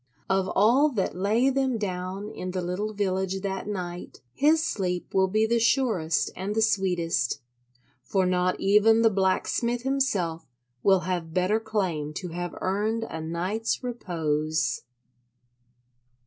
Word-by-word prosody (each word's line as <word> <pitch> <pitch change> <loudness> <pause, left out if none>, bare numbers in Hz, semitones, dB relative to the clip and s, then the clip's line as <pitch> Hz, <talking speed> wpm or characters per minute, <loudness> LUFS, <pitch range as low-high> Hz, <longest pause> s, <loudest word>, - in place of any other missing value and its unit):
Of 190 0 +1
all 245 +9 +5
that 195 -6 -1
lay 220 +8 +2
them 265 -2 0
down 190 0 -4
in 185 - -5
the 185 0 -2
little 185 +5 -2
village 190 -2 -1
that 195 0 -3
night, 180 -4 -5
his 315 +3 +3
sleep 180 - -2
will 190 0 +4
be 215 +3 +2
the 235 +1 +2
surest 225 - +1
and 195 +4 -3
the 220 - +2
sweetest. 170 - +1 0.6
For 190 -2 0
not 180 0 +1
even 210 +3 +4
the 225 - +5
blacksmith 215 +5 0
himself 230 - 0 0.3
will 190 -2 +4
have 175 -2 -3
better 185 +4 +2
claim 185 -9 -2
to 180 +1 -5
have 175 +1 -5
earned 210 +4 0
a 160 -7 -5
night's 180 +10 -2
repose. 155 - -1
190 Hz, 135 wpm, -26 LUFS, 180-220 Hz, 0.6 s, all